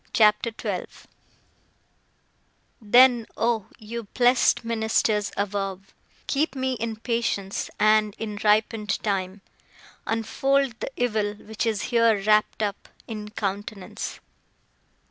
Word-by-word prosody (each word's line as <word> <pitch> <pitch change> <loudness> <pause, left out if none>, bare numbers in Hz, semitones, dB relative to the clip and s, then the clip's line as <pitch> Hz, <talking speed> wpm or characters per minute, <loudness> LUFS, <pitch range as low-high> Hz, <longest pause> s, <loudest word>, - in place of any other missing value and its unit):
CHAPTER 210 +1 +4
XII - - -5 1.7
Then, 240 +2 +5
oh, 225 -3 0
you 230 +1 -7
blessed 245 -1 +3
ministers 220 -2 +1
above, 195 -1 -3 0.3
Keep 290 0 0
me 260 0 -1
in 230 -2 -3
patience; 220 -4 -2
and, 215 -1 +3
in 210 -2 -5
ripen'd 215 0 +1
time, 195 -1 -2 0.7
Unfold 250 +3 0
the - - -3
evil 215 -4 0
which 220 +2 -4
is 215 -2 -1
here 230 -3 +4
wrapt 215 +1 +2
up 205 -1 -4 0.2
In 210 -2 -6
countenance. 200 -2 -5
215 Hz, 105 wpm, -25 LUFS, 205-235 Hz, 1.7 s, Then